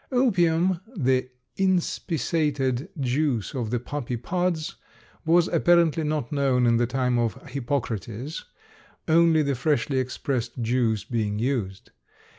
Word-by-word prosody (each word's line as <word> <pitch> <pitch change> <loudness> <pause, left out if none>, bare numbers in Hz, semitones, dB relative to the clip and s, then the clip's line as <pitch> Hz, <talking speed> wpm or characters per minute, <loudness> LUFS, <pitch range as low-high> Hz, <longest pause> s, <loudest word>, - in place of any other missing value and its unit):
Opium, 185 -8 +2 0.2
the 130 -3 +1 0.3
inspissated 160 -6 0
juice 130 -3 0
of 120 -5 -3
the 120 +1 0
poppy 125 -1 -4
pods, 170 +4 -2 0.5
was 170 +1 +4
apparently 170 -1 +3
not 150 -5 -2
known 135 -4 +2
in 115 -1 +4
the 120 0 +1
time 125 -1 0
of 115 -4 0
Hippocrates, 125 0 -3 0.6
only 165 -1 +4
the 140 -1 0
freshly 135 0 0
expressed 130 -1 -3
juice 115 -3 +1
being 105 -3 -2
used. 110 -6 -2
135 Hz, 115 wpm, -25 LUFS, 120-160 Hz, 0.6 s, was